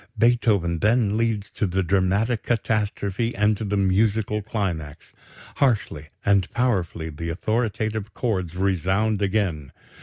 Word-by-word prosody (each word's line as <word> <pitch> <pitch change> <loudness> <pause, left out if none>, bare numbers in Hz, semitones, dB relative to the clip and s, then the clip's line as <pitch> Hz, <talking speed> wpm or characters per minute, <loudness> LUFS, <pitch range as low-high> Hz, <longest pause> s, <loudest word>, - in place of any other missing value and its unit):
Beethoven 105 -8 +2
then 105 0 +2
leads 110 -3 -1
to 105 - -1
the 95 +1 0
dramatic 100 +5 +1
catastrophe 110 -1 -1
and 105 +1 +3
to 110 - -5
the 105 0 -1
musical 105 +2 +1
climax. 85 -8 -4 0.5
Harshly 105 - 0 0.2
and 100 -2 +3
powerfully 90 -10 -1
the 85 +3 -5
authoritative 110 +3 -2
chords 95 -9 -2
resound 95 +3 +1
again.... 95 -9 -1
100 Hz, 120 wpm, -24 LUFS, 95-110 Hz, 0.5 s, and